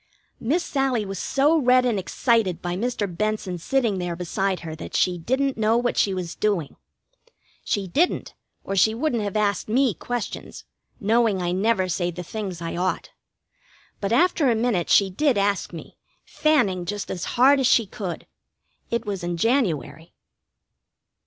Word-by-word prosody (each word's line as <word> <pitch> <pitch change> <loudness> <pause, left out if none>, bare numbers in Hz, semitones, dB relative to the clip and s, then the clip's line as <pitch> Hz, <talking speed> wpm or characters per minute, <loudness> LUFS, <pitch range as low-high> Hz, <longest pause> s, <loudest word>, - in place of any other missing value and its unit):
Miss 315 +10 0
Sallie 265 -6 0
was 195 -2 -5
so 295 +4 +2
red 255 -2 +4
and 230 -5 +1
excited 215 -2 +1
by 175 0 -3
Mr. 230 +1 -1
Benson 195 -1 -2
sitting 230 -1 0
there 175 -1 -3
beside 185 +2 -2
her 160 -1 -6
that - - -8
she 180 -1 +2
didn't 260 +7 -1
know 220 +1 +3
what 245 0 0
she 200 - +2
was 180 -2 -4
doing. 195 -9 -1 0.9
She 200 -2 -1
didn't, 315 - 0 0.3
or 195 - -3
she 220 +4 +4
wouldn't 245 -2 0
have 205 0 -2
asked 205 0 0
me 250 0 +3
questions, 245 +7 -5 0.3
knowing 220 -1 +2
I 175 -1 -1
never 190 0 +1
say 175 0 -1
the 175 +1 -6
things 185 -3 -5
I 165 - -4
ought. 185 +2 -2 0.9
But 200 0 -2
after 290 +2 +3
a 235 - +3
minute 220 -7 0
she 195 -2 +4
did 265 +4 +1
ask 200 -1 0
me, 170 - -10 0.3
fanning 270 - +1
just 205 +2 -4
as 175 - -4
hard 275 +3 +6
as 260 - +3
she 230 -3 +4
could. 190 -3 -6 0.6
It 235 0 -2
was 195 -4 -4
in 175 0 -2
January. 165 - -1
205 Hz, 165 wpm, -24 LUFS, 180-245 Hz, 0.9 s, hard